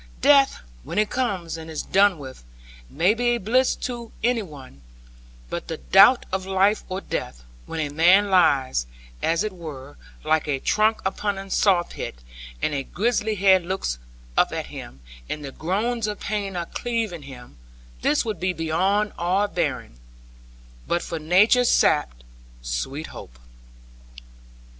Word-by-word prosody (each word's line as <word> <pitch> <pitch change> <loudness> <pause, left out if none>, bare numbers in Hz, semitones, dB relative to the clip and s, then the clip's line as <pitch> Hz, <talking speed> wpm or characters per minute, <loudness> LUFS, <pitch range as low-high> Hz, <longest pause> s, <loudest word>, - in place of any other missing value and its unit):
Death, 275 - +5 0.2
when - - -7
it 210 0 +2
comes 190 -10 -2
and 160 0 -9
is 155 - -4
done 195 -1 +3
with, 130 - -10 0.5
may 175 +8 +2
be 240 +1 +1
a - - -1
bliss 245 +5 +2
to 235 -2 -6
any 240 -1 +2
one; 140 - -12 0.7
but - - -5
the - - -4
doubt 65 - +6
of 190 0 -1
life 195 +2 +2
or 185 +1 -3
death, - - -5 0.2
when 165 - -5
a 145 -2 -2
man 185 +6 +5
lies, 135 - +3 0.3
as 165 +4 +1
it 215 -2 -3
were, 145 -6 -9 0.3
like 160 -1 +1
a 145 -2 0
trunk 215 +8 +2
upon 200 +1 -1
a 195 0 -8
sawpit 180 - +1 0.5
and 155 - +1
a 140 - -1
grisly 215 - -1
head 190 -2 +4
looks 170 - -3 0.4
up - - +3
at - - -3
him, 65 +2 -9 0.3
and 150 -1 -4
the 135 - -6
groans 215 - -1
of 210 -1 -4
pain 200 -2 -3
are 170 -1 -2
cleaving 225 -6 -3
him, 130 - -12 0.4
this 150 - +2
would 215 -5 -3
be 185 0 0
beyond 185 +6 0
all 185 +4 +1
bearing 130 - -3 0.9
but 175 - 0
for 165 - -5
Nature's 210 +10 +4
sap - - +3 0.5
sweet 135 - -3
hope.' - - -11
185 Hz, 150 wpm, -24 LUFS, 150-210 Hz, 0.9 s, doubt